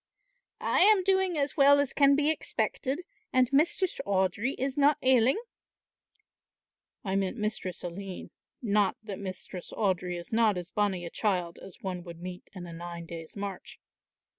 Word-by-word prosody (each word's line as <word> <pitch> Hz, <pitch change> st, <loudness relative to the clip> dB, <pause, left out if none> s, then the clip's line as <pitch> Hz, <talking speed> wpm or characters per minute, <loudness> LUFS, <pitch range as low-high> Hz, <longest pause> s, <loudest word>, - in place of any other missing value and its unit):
"I -, -, +2 dB
am 405 Hz, 0 st, +7 dB
doing 380 Hz, -2 st, +2 dB
as 280 Hz, -1 st, 0 dB
well 285 Hz, -1 st, +6 dB
as 285 Hz, -2 st, 0 dB
can 280 Hz, -1 st, +5 dB
be 295 Hz, +2 st, +3 dB
expected, 290 Hz, -1 st, -2 dB, 0.3 s
and 255 Hz, 0 st, +2 dB
Mistress 340 Hz, +5 st, +2 dB
Audry 200 Hz, +6 st, 0 dB
is 265 Hz, +1 st, -2 dB
not 290 Hz, +1 st, +4 dB
ailing." 255 Hz, -, +5 dB, 1.7 s
"I 190 Hz, -3 st, -1 dB
meant 195 Hz, +4 st, -1 dB
Mistress 210 Hz, -4 st, -3 dB
Aline, 185 Hz, +1 st, -7 dB, 0.3 s
not 205 Hz, -3 st, +2 dB
that 205 Hz, -3 st, -6 dB
Mistress 185 Hz, -2 st, -7 dB
Audry 180 Hz, -4 st, -1 dB
is 170 Hz, -, -9 dB
not 220 Hz, -4 st, +3 dB
as 175 Hz, 0 st, -6 dB
bonnie 195 Hz, -4 st, 0 dB
a 170 Hz, -, -6 dB
child 180 Hz, -5 st, -1 dB
as 190 Hz, -, -12 dB
one 180 Hz, -2 st, -4 dB
would 170 Hz, -2 st, -10 dB
meet 180 Hz, +1 st, -8 dB
in 180 Hz, -2 st, -7 dB
a 170 Hz, -, -9 dB
nine 170 Hz, 0 st, -7 dB
days' 165 Hz, -1 st, -9 dB
march." 200 Hz, -2 st, -6 dB
200 Hz, 160 wpm, -29 LUFS, 180-275 Hz, 1.7 s, am